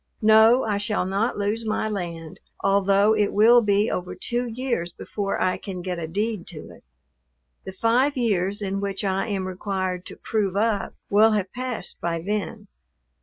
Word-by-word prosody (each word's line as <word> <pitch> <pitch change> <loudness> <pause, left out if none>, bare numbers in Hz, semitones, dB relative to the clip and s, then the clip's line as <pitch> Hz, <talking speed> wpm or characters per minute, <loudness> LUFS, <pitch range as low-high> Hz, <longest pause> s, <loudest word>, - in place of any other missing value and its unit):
No, 220 +4 +6
I 205 -2 -1
shall 205 -2 0
not 200 +5 -1
lose 210 +3 -1
my 215 0 -1
land, 170 -6 -5 0.2
although 200 +2 +3
it 210 -1 +1
will 235 +4 +6
be 205 0 +2
over 180 0 -4
two 245 +1 -2
years 235 -7 -2
before 200 +2 -4
I 185 0 +1
can 185 -3 -7
get 180 -2 -3
a 160 - -4
deed 205 +2 -2
to 155 -4 -9
it. - - -16 0.8
The - - -5
five 240 +8 +1
years 205 -3 0
in 195 0 -2
which 200 0 -2
I 195 +2 0
am 195 -3 -2
required 185 -1 -3
to - - -9
"prove 200 -4 -2
up" 210 -1 0 0.2
will 215 +2 +5
have 200 -3 -2
passed 250 -6 -5
by 170 -1 -1
then. 210 +3 -4
205 Hz, 170 wpm, -24 LUFS, 185-220 Hz, 0.8 s, No